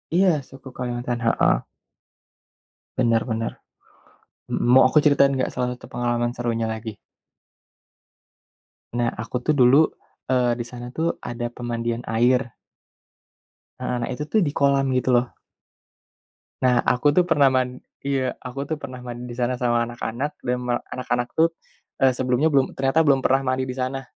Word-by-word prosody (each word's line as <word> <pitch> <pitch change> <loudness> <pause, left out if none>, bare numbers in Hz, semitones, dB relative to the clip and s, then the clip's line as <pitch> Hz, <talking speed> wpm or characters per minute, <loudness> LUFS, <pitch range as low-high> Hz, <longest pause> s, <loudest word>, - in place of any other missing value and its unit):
Iya, 190 +1 +5 0.2
suku 135 0 -13
Kalimantan. 120 -1 -3
Heeh. 115 - +3 1.4
Benar 115 -1 +3
benar. 115 +1 -1 1.0
Mhm, - - -2
mau 130 - +8
aku 150 +3 +3
ceritain 140 -2 +4
enggak 130 - -1
salah 125 -1 -2
satu - - -15
pengalaman 120 0 0
serunya 115 -2 -2
lagi? 110 -1 -6 2.0
Nah, 120 -1 +1
aku, 120 +2 -4
tuh, 155 - +2
dulu 135 +5 +5 0.4
eee, 125 -2 +2
di 120 - -4
sana, 120 0 -8
tuh, 165 +1 -1
ada 120 0 -5
pemandian 120 0 -3
air. 120 +2 +2 1.3
Heeh, 125 - -1
nah - - -3
itu 150 - -4
tuh, 220 - +4
di - - -1
kolam, 140 -1 +3
gitu 130 - 0
loh. 120 +1 +3 1.4
Nah, 125 -1 +4
aku, 145 +4 +2
tuh, 180 - +5
pernah 140 -3 +4
man 125 0 0 0.2
iya. 135 -2 -1
Aku, 135 +2 -5
tuh, 155 +1 -3
pernah 130 -2 -7
mandi 120 0 -7
di 120 - -7
sana 125 0 0
sama 120 -1 +2
anak-anak, 120 +4 -4
dan 125 0 -1
me 120 - 0 0.2
anak-anak, 125 -1 -2
tuh, 165 +1 +4 0.5
eee, 130 -1 +5
sebelumnya 130 +4 +2
belum 135 -2 +2
ternyata 135 +4 +2
belum 135 -2 +4
pernah 135 +1 +3
mandi 130 0 -1
di 125 - -4
sana. 130 +1 -2
125 Hz, 155 wpm, -23 LUFS, 120-135 Hz, 2.0 s, mau